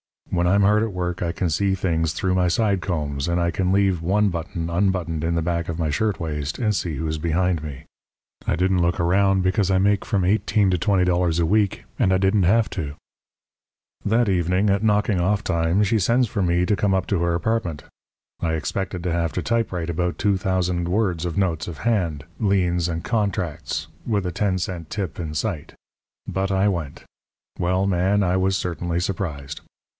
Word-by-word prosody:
When 90 Hz, -1 st, +1 dB
I'm 100 Hz, +3 st, +4 dB
hard 105 Hz, +2 st, +4 dB
at 110 Hz, -2 st, -2 dB
work 90 Hz, 0 st, -3 dB
I 85 Hz, -1 st, -1 dB
can 95 Hz, -2 st, -1 dB
see 95 Hz, +4 st, +1 dB
things 80 Hz, -4 st, 0 dB
through 90 Hz, +3 st, 0 dB
my 90 Hz, -1 st, +2 dB
side 100 Hz, +1 st, +1 dB
combs; 75 Hz, -4 st, -2 dB
and 85 Hz, 0 st, +1 dB
I 85 Hz, 0 st, +1 dB
can 90 Hz, +2 st, 0 dB
leave 95 Hz, -3 st, +2 dB
one 100 Hz, +4 st, +2 dB
button 85 Hz, -1 st, -4 dB
unbuttoned 85 Hz, -3 st, 0 dB
in 85 Hz, +1 st, 0 dB
the 85 Hz, -, +1 dB
back 85 Hz, 0 st, -2 dB
of 80 Hz, -, -3 dB
my 80 Hz, -3 st, -1 dB
shirtwaist 80 Hz, -6 st, -2 dB
and 110 Hz, -4 st, +1 dB
see 90 Hz, -5 st, -2 dB
who's 80 Hz, +2 st, -3 dB
behind 85 Hz, +1 st, 0 dB
me. 75 Hz, -4 st, -7 dB, 0.6 s
I -, -, +2 dB
didn't 90 Hz, +1 st, +2 dB
look 85 Hz, +1 st, +1 dB
around, 95 Hz, +2 st, +3 dB
because 95 Hz, +1 st, +1 dB
I 95 Hz, -, +3 dB
make 100 Hz, +1 st, +2 dB
from 100 Hz, -4 st, 0 dB
eighteen 100 Hz, +1 st, +2 dB
to 90 Hz, -, +2 dB
twenty 95 Hz, +1 st, +2 dB
dollars 90 Hz, -2 st, +1 dB
a 85 Hz, -, +2 dB
week, 100 Hz, +2 st, +1 dB, 0.2 s
and 95 Hz, -, +3 dB
I 95 Hz, -, +4 dB
didn't 95 Hz, +1 st, +2 dB
have 110 Hz, +5 st, +3 dB
to. 75 Hz, -6 st, -4 dB, 1.1 s
"That 115 Hz, +1 st, +2 dB
evening 90 Hz, +2 st, +2 dB
at 100 Hz, 0 st, +1 dB
knocking 105 Hz, -3 st, +2 dB
off 100 Hz, +4 st, +1 dB
time 85 Hz, +3 st, +1 dB
she 105 Hz, +2 st, +2 dB
sends 120 Hz, +5 st, +2 dB
for 100 Hz, -, -2 dB
me 90 Hz, 0 st, +2 dB
to 105 Hz, +2 st, +1 dB
come 95 Hz, +1 st, +2 dB
up 95 Hz, -1 st, 0 dB
to 95 Hz, -4 st, 0 dB
her 85 Hz, 0 st, +1 dB
apartment. 85 Hz, -5 st, -1 dB, 0.6 s
I 80 Hz, -1 st, -1 dB
expected 90 Hz, +3 st, -3 dB
to 90 Hz, -, -1 dB
have 85 Hz, -1 st, -1 dB
to 90 Hz, -, -2 dB
typewrite 95 Hz, -8 st, -1 dB
about 90 Hz, +1 st, -1 dB
two 100 Hz, -1 st, +2 dB
thousand 90 Hz, -2 st, 0 dB
words 90 Hz, -3 st, 0 dB
of 85 Hz, +1 st, -3 dB
notes 90 Hz, -5 st, 0 dB
of 85 Hz, -4 st, -7 dB
hand, 90 Hz, -11 st, 0 dB, 0.2 s
liens, 90 Hz, -4 st, +1 dB
and 85 Hz, -1 st, -3 dB
contracts, 100 Hz, -8 st, -2 dB, 0.2 s
with 105 Hz, -5 st, 0 dB
a 90 Hz, -, -1 dB
ten 95 Hz, +1 st, 0 dB
cent 85 Hz, -3 st, -4 dB
tip 95 Hz, -6 st, -4 dB
in 80 Hz, -3 st, -4 dB
sight; 85 Hz, -2 st, -3 dB, 0.5 s
but 95 Hz, 0 st, -2 dB
I 95 Hz, +1 st, +3 dB
went. 85 Hz, -7 st, -4 dB, 0.6 s
Well, 90 Hz, +2 st, +1 dB
Man, 100 Hz, +2 st, +2 dB
I 90 Hz, 0 st, +1 dB
was 95 Hz, +1 st, +1 dB
certainly 85 Hz, -1 st, -2 dB
surprised. 85 Hz, -7 st, -4 dB
90 Hz, 200 wpm, -23 LUFS, 85-100 Hz, 1.1 s, I'm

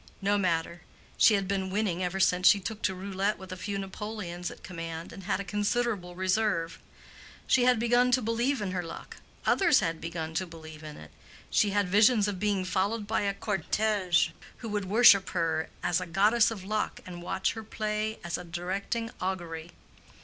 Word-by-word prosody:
No 200 Hz, +1 st, +1 dB
matter; 170 Hz, -3 st, 0 dB, 0.3 s
she 215 Hz, -, +6 dB
had 195 Hz, -1 st, -1 dB
been 190 Hz, -1 st, -1 dB
winning 190 Hz, -3 st, -1 dB
ever 185 Hz, +1 st, -2 dB
since 180 Hz, 0 st, +4 dB
she 200 Hz, -, +7 dB
took 215 Hz, +3 st, -6 dB
to 190 Hz, -, 0 dB
roulette 195 Hz, +2 st, -1 dB
with 190 Hz, 0 st, -11 dB
a -, -, -4 dB
few 195 Hz, +2 st, -4 dB
napoleons 195 Hz, -3 st, -5 dB
at -, -, -13 dB
command, 165 Hz, -2 st, -6 dB
and 195 Hz, -, -10 dB
had 200 Hz, -, 0 dB
a -, -, -3 dB
considerable 205 Hz, -1 st, -1 dB
reserve. 185 Hz, -3 st, 0 dB, 0.7 s
She 250 Hz, -2 st, +3 dB
had 250 Hz, -1 st, +5 dB
begun 240 Hz, +2 st, +3 dB
to 255 Hz, -, +4 dB
believe 235 Hz, +2 st, 0 dB
in 190 Hz, -, -2 dB
her 185 Hz, -1 st, -1 dB
luck, 165 Hz, -1 st, -9 dB, 0.3 s
others 345 Hz, -7 st, +4 dB
had 165 Hz, -4 st, -2 dB
begun 165 Hz, -1 st, -4 dB
to 185 Hz, +3 st, -1 dB
believe 160 Hz, -2 st, -11 dB
in 155 Hz, -1 st, -9 dB
it: 75 Hz, -1 st, -12 dB, 0.4 s
she 210 Hz, -, +3 dB
had 205 Hz, -1 st, +1 dB
visions 210 Hz, +2 st, +4 dB
of 200 Hz, -3 st, -3 dB
being 200 Hz, -2 st, 0 dB
followed 200 Hz, +4 st, 0 dB
by 220 Hz, +1 st, 0 dB
a 200 Hz, -1 st, 0 dB
cortège 200 Hz, -2 st, +1 dB, 0.3 s
who 230 Hz, -, -7 dB
would 205 Hz, -2 st, -2 dB
worship 200 Hz, -1 st, +6 dB
her 165 Hz, -1 st, 0 dB
as 180 Hz, 0 st, +1 dB
a 180 Hz, -, -5 dB
goddess 210 Hz, +7 st, +4 dB
of 215 Hz, -5 st, -6 dB
luck 215 Hz, +2 st, -2 dB
and 175 Hz, -2 st, -8 dB
watch 190 Hz, +2 st, -1 dB
her 225 Hz, -, -7 dB
play 215 Hz, 0 st, -2 dB
as 170 Hz, -1 st, -3 dB
a -, -, -7 dB
directing 190 Hz, +7 st, -3 dB
augury. 175 Hz, -3 st, -4 dB
195 Hz, 190 wpm, -29 LUFS, 175-215 Hz, 0.7 s, she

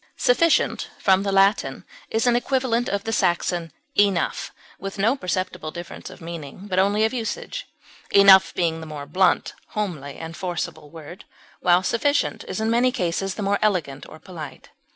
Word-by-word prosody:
Sufficient, 325 Hz, +6 st, +2 dB
from 190 Hz, -1 st, +3 dB
the 200 Hz, 0 st, -1 dB
Latin, 195 Hz, +1 st, +2 dB, 0.2 s
is 225 Hz, +2 st, 0 dB
an 245 Hz, -1 st, +4 dB
equivalent 245 Hz, -1 st, 0 dB
of 200 Hz, 0 st, -2 dB
the 225 Hz, -, -3 dB
Saxon 175 Hz, -3 st, 0 dB, 0.2 s
enough, 200 Hz, -4 st, +1 dB, 0.3 s
with 195 Hz, +2 st, -6 dB
no 220 Hz, +6 st, +2 dB
perceptible 180 Hz, -, -3 dB
difference 175 Hz, +2 st, -8 dB
of -, -, -13 dB
meaning, 165 Hz, -2 st, -8 dB
but 185 Hz, -2 st, 0 dB
only 205 Hz, +3 st, +3 dB
of 220 Hz, -, -1 dB
usage, 480 Hz, -, -4 dB, 0.4 s
enough 195 Hz, -1 st, +7 dB
being 165 Hz, -2 st, 0 dB
the 160 Hz, -, -8 dB
more 150 Hz, -2 st, -7 dB
blunt, 180 Hz, +5 st, +2 dB, 0.2 s
homely, 155 Hz, -10 st, -3 dB
and 165 Hz, 0 st, -8 dB
forcible 175 Hz, -4 st, -4 dB
word, 165 Hz, +3 st, -11 dB, 0.3 s
while 180 Hz, +1 st, +4 dB
sufficient 285 Hz, +8 st, 0 dB
is -, -, -4 dB
in 220 Hz, +1 st, 0 dB
many 245 Hz, +2 st, +3 dB
cases 185 Hz, -2 st, -2 dB
the 210 Hz, -, -4 dB
more 200 Hz, +1 st, +1 dB
elegant 170 Hz, -10 st, 0 dB
or -, -, -11 dB
polite. 160 Hz, -4 st, -10 dB
190 Hz, 165 wpm, -23 LUFS, 170-220 Hz, 0.4 s, enough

